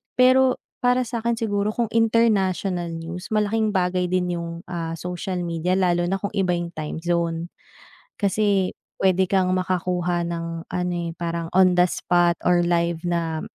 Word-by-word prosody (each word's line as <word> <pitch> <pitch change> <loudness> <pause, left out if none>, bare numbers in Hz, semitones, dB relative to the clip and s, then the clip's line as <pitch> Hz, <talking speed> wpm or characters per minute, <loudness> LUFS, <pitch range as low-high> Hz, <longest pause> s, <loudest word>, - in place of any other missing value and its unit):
Pero 255 0 +5 0.2
para 250 +1 +2
sa'kin 235 0 -2
siguro 210 -1 -1
kung 235 -2 -1
international 195 -6 +1
news, 165 +2 -6
malaking 215 0 +1
bagay 180 0 +1
din 180 -1 0
yung, 170 0 -5 0.2
ah, 165 -2 -4
social 180 +1 -4
media, 170 +1 -1
lalo 175 -2 +2
na 190 - 0
kung 200 - -3
iba 185 -3 +1
yung 170 0 -4
time 155 +1 -4
zone. 170 -1 -1 0.7
Kasi 200 -2 +1 0.3
pwede 190 0 +3
kang 185 -1 +1
makakuha 180 -1 -1
ng 165 0 -5
ano 180 0 -2
eh, 170 -1 -3
parang 170 -1 -3
on 185 -1 +6
the 180 0 +5
spot 175 0 +2
or 175 -1 +4
live 170 -1 0
na 165 -2 -1
180 Hz, 155 wpm, -23 LUFS, 170-200 Hz, 0.7 s, on